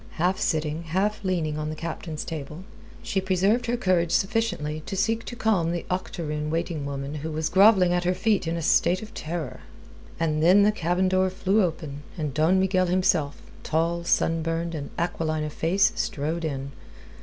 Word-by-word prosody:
Half 180 +3 0
sitting, 155 0 -1
half 195 +6 -1
leaning 165 -5 -1
on 155 0 -3
the 155 - -4
Captain's 160 -1 -5
table, 155 +1 -6 0.4
she 230 -5 -1
preserved 195 +6 +1
her 240 +1 0
courage 175 -5 +1
sufficiently 195 -8 0
to - - -3
seek 225 +3 +1
to 240 - -6
calm 205 -8 +1
the 175 -1 -3
octoroon 155 -5 -3
waiting 165 -2 -2
woman 140 0 -4
who 155 +1 -4
was 155 0 -1
grovelling 190 -2 +5
at 175 0 +1
her 180 +1 +2
feet 200 -2 +1
in 165 +1 -1
a 165 - -4
state 185 +5 +3
of 220 +1 -11
terror. 155 -6 -5 0.6
And 155 -2 0
then 185 +5 +6
the 210 - +5
cabin 180 -1 0
door 185 0 +2
flew 195 +3 +1
open, 155 -4 -4 0.2
and 150 -4 -3
Don 160 +6 +3
Miguel 185 -1 +2
himself, 175 -5 +1 0.2
tall, 165 +2 0
sunburned, 165 0 0
and 145 -3 -5
aquiline 160 -2 -1
of 150 -1 -5
face, 190 +6 +2
strode 170 -7 -2
in. 140 -2 -4
170 Hz, 180 wpm, -25 LUFS, 155-190 Hz, 0.6 s, then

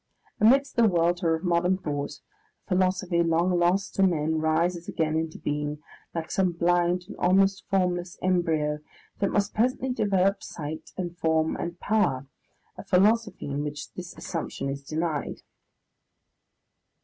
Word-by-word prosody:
Amidst 270 +6 +4
the 230 -1 +6
welter 170 -2 +2
of 160 - -7
modern 175 +1 +2
thought, 145 -4 -4 0.4
a - - -31
philosophy 185 -1 +1
long 170 +2 +2
lost 180 +3 +1
to - - 0
men 160 -4 +2
rises 165 +2 0
again 155 -1 0
into 160 0 -2
being, 150 0 -2 0.4
like 165 -1 -4
some 185 -2 +1
blind 175 +1 +2
and - - -9
almost 195 +2 +3
formless 180 -2 0
embryo, 160 -5 +1 0.4
that 200 - +1
must 205 0 0
presently 255 +3 +1
develop 195 -4 +1
sight, 155 +1 -7
and 175 -2 -4
form, 160 0 +1
and 170 0 -5
power, 175 -12 +1 0.5
a - - -6
philosophy 205 +3 +2
in 145 +1 -2
which 145 -1 -6
this 180 -1 -8
assumption 165 -5 -4
is 140 0 -4
denied. 155 +1 -3
175 Hz, 140 wpm, -26 LUFS, 160-190 Hz, 0.5 s, the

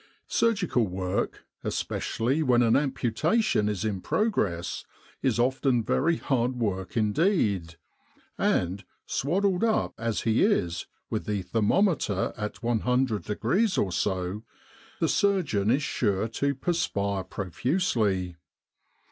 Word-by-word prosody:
Surgical 185 - +1
work, 90 0 -3 0.2
especially 130 +7 -1
when 125 -4 +4
an 115 -1 +4
amputation 135 - +1
is 105 -1 -2
in 100 -4 -2
progress, 105 - -1 0.4
is 130 -4 +1
often 125 0 +2
very 165 +9 +2
hard 125 -1 0
work 100 -4 -2
indeed; 105 - +1 0.6
and, 90 +3 0 0.2
swaddled 185 - 0
up 225 -1 +1
as 115 -2 -1
he 110 0 +2
is, 90 - +1 0.2
with - - -2
the 105 -3 -1
thermometer 110 - +1
at 105 +3 -5
100 120 0 +1
degrees 190 - +1
or 95 - +1
so, 95 +3 -1 0.6
the - - +2
surgeon 155 - +1
is 135 +5 +2
sure 100 -3 0
to 140 +5 -1
perspire 100 - -1
profusely. 100 - -1
115 Hz, 115 wpm, -27 LUFS, 100-150 Hz, 0.6 s, when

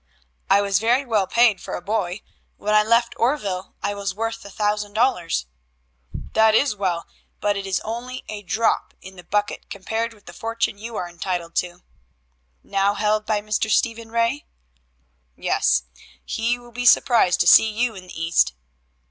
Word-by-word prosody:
"I 200 +1 +5
was 200 -1 +2
very 240 +5 +2
well 215 -6 +1
paid 230 -2 +3
for - - -5
a - - -5
boy. 200 -2 -2 0.3
When 210 +1 -1
I 215 - +6
left 230 +2 +2
Oreville 205 -8 -1
I 205 - 0
was 200 -1 -4
worth 225 +1 -3
a 200 - -10
thousand 210 0 -1
dollars." 175 - +1 0.9
"That 220 0 +5
is 270 -2 +3
well, 185 -4 -1 0.3
but 205 0 +1
it 200 -1 -4
is 190 - 0
only 240 +3 -5
a 210 -1 -6
drop 220 +4 0
in 190 0 -12
the 180 - -12
bucket 205 +3 -2
compared 225 +4 -3
with 205 - -23
the - - -11
fortune 225 -2 -2
you 230 +1 -7
are 180 - -3
entitled 175 -1 -4
to." 180 0 -2 0.8
"Now 200 +1 +1
held 215 0 0
by 210 -2 +1
Mr. 215 +1 -1
Stephen 230 +1 0
Ray?" 230 +5 0 0.9
"Yes; 65 -1 +1 0.4
he 230 +2 0
will 240 0 -15
be 245 +1 -1
surprised 230 -7 +5
to - - +2
see 220 - +8
you 230 +2 -1
in 185 -3 -11
the 180 - -9
East." 165 - +2
210 Hz, 175 wpm, -22 LUFS, 195-230 Hz, 0.9 s, see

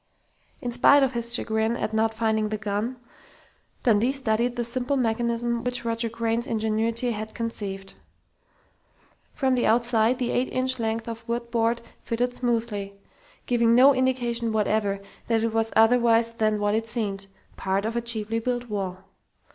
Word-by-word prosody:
In 245 - -2
spite 275 +4 +5
of 265 -1 +1
his 235 0 -1
chagrin 220 0 0
at 215 - -3
not 220 0 +2
finding 220 -1 0
the 215 - -2
gun, 210 +4 -3 0.9
Dundee 230 +1 +3
studied 245 -2 0
the 240 - -1
simple 255 +4 -2
mechanism 235 0 0
which 250 0 -1
Roger 230 0 0
Crain's 230 +1 -1
ingenuity 225 +2 0
had 215 0 -6
conceived. 200 -4 -5 1.4
From 265 -2 +1
the 250 - +2
outside, 235 +1 +3
the 245 -2 -1
eight 255 +1 +1
inch 255 0 0
length 225 0 -2
of 230 -1 -6 0.3
board 230 0 +1 0.2
fitted 245 +2 -1
smoothly, 225 -5 -2 0.5
giving 235 -1 +3
no 265 +3 +7
indication 245 -3 0
whatever 210 -2 0 0.3
that 225 -1 +1
it 230 -1 -1
was 225 0 0
otherwise 230 0 +4
than 215 -2 +1
what 205 0 +1
it 225 +1 -1
seemed 200 -4 -3 0.3
part 195 +2 -1
of 225 +1 -2
a 235 - 0
cheaply 225 -1 -2
built 245 0 -3
wall. 190 -3 -4
230 Hz, 155 wpm, -25 LUFS, 220-240 Hz, 1.4 s, no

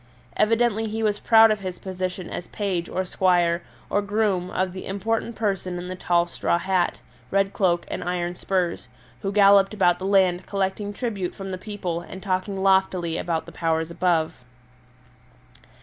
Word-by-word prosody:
Evidently 225 0 +2
he 220 +1 -3
was 210 -1 +1
proud 225 -1 +6
of 215 - 0
his 185 -2 -5
position 185 -1 -4
as 175 - -5
page 190 -5 -2
or 185 - -2
squire 175 -2 +2 0.3
or 205 - +1
groom 200 -3 0
of 185 0 -1
the 185 - -7
important 225 +4 -2
person 195 -4 -2
in 180 +1 -6
the 185 - -4
tall 175 -1 +2
straw 170 0 0
hat, 185 0 0 0.3
red 195 0 +1
cloak, 175 -3 +1
and - - -4
iron 175 -1 -2
spurs, 180 -1 -2 0.3
who 195 - -2
galloped 200 0 +5
about 175 -4 +3
the 190 - -4
land 185 -2 +3
collecting 195 +1 -2
tribute 205 -5 -3
from 195 -1 -6
the - - -2
people 185 -5 -4
and 190 +2 -10
talking 190 0 -1
loftily 190 -3 +2
about 165 -2 -2
the - - -11
Powers 160 0 -1
above. 165 -6 0
190 Hz, 165 wpm, -24 LUFS, 175-200 Hz, 0.3 s, proud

